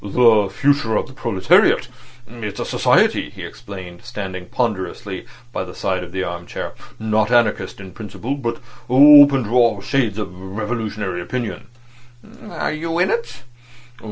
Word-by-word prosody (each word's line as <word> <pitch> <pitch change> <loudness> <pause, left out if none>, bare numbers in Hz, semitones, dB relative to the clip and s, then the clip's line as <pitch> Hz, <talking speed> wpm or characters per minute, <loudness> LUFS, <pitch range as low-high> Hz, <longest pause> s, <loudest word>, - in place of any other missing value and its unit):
"The 105 -1 +4
Future 130 +1 +1
of - - 0
the 130 - -14
Proletariat. 115 -9 +3 0.4
It's 115 -4 -7
a - - -2
society," - - +2
he - - -10
explained, 95 -3 -10
standing 95 -3 -6
ponderously 100 -4 -3 0.3
by - - -2
the 90 -1 -10
side 95 -2 -2
of 85 - -10
the 95 +1 -2
arm 85 -1 -6
chair, - - -6 0.2
"not 110 -1 0
anarchist 115 -6 +1
in 95 -2 -10
principle, 110 +6 -6
but 120 -5 -3 0.3
open 140 0 +8
to 110 - -6
all 120 -4 +3
shades 110 -1 -1
of 100 -4 -5
revolutionary 105 -1 -4
opinion." 120 +3 -5 0.8
"Are - - -3
you 165 +2 -3
in 175 - +2
it?" 470 0 -3
110 Hz, 150 wpm, -20 LUFS, 95-125 Hz, 0.8 s, open